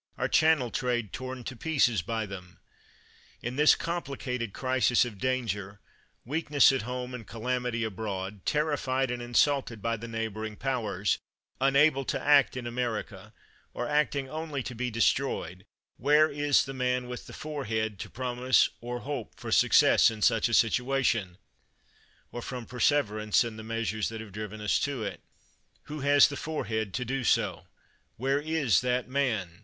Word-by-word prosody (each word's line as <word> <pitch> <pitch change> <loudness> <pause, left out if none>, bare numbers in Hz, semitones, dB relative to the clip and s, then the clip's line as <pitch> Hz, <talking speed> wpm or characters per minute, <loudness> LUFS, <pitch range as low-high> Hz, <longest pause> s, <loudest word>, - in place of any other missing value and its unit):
Our - - 0
Channel 155 -7 +3
trade 120 -4 -1
torn 130 -1 -6
to 130 - -6
pieces 125 - +2
by 110 +5 -3
them! 90 -2 -10 0.9
In 120 +2 -3
this 150 +2 +6
complicated 135 -9 -4
crisis 130 0 +2
of 105 -5 -8
danger, 105 -6 -2 0.5
weakness 145 +1 +4
at 135 - -1
home, 125 +1 -5
and 115 -5 -8
calamity 125 0 -2
abroad, 100 -2 -4
terrified 135 -4 0
and 120 0 -4
insulted 120 0 +1
by 115 +2 -1
the 115 +2 -8
neighboring 110 -1 -4
powers, 110 -6 -1 0.4
unable 135 +1 +4
to - - -1
act 140 -3 +4
in 125 - -5
America, 120 -2 -4 0.4
or 120 - -2
acting 145 -1 +1
only 155 -2 -4
to 125 - -6
be 125 +2 -2
destroyed, 115 -6 0 0.3
where 150 +4 +4
is 145 -1 +2
the 135 - -6
man 125 -1 -1
with 125 0 -7
the - - -10
forehead 110 -9 -3
to - - -6
promise 125 +1 +2
or 120 +1 -5
hope 140 -5 -5
for - - -6
success - - +5
in 110 -2 -5
such 115 +1 +3
a 120 - +2
situation, 115 -6 +1 0.9
or 120 - -6
from 125 -1 -6
perse 125 +1 +2
verance 110 -7 +1
in 115 -2 -5
the 110 - -8
measures 110 -1 -2
that 115 0 -7
have 110 -2 -9
driven 105 +1 -6
us 105 - +1
to 140 -5 -2
it? 100 -2 -5 0.6
"Who 150 +1 -7
has 145 +1 +6
the 140 - -6
forehead 110 -9 -3
to 125 - -2
do 135 +2 -2
so? - - +1 0.5
Where 135 +4 +1
is 155 -6 +2
that 125 0 0
man 110 -10 -1
125 Hz, 160 wpm, -28 LUFS, 110-135 Hz, 0.9 s, this